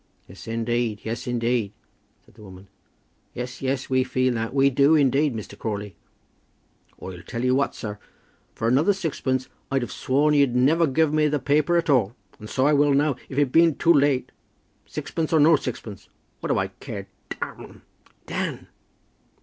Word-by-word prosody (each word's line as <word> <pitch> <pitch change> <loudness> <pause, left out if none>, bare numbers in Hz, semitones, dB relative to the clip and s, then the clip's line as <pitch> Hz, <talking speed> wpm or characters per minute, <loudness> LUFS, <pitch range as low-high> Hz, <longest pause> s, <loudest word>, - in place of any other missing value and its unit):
"Yes, 95 +5 -13
indeed; 115 -1 -1
yes, 115 +1 -5
indeed," 120 -3 0 0.5
said - - -23
the 110 - -17
woman. 95 -1 -13 0.7
"Yes, 125 0 -6
yes, 135 0 -2
we 130 -1 +2
feel 130 0 0
that; 115 -1 -3
we 140 0 +3
do 140 +4 +4
indeed, 140 -1 +2
Mr. 110 - -7
Crawley." 105 -3 -5 1.0
"I 95 -1 -8
tell 115 +8 -5
you 130 - +3
what, 140 +2 0
sir; 105 -1 -6 0.6
for 115 - -2
another 145 - +3
sixpence 140 -8 -2 0.2
I'd 135 -2 0
've 115 - -6
sworn 145 +8 +1
you'd 140 -4 +3
never 155 +7 +3
guv' 150 +2 +1
me 155 0 +3
the 150 0 0
paper 145 +5 +2
at 170 - 0
all; 120 -6 +2 0.2
and 105 - -10
so 130 - +1
I 150 - +4
will 145 -1 +4
now, 145 -1 +2
if 135 - -7
it 145 -3 +2
bean't 165 -1 +4
too 170 - +4
late; 140 -3 +2 0.6
sixpence 160 -2 -4
or 160 - +5
no 155 +2 +6
sixpence. 115 -7 -6 0.3
What - - -4
do - - +2
I - - 0
care? - - -8 0.2
d - - -6
them." - - -8 0.4
"Dan!" - - -4
130 Hz, 175 wpm, -24 LUFS, 115-145 Hz, 1.0 s, no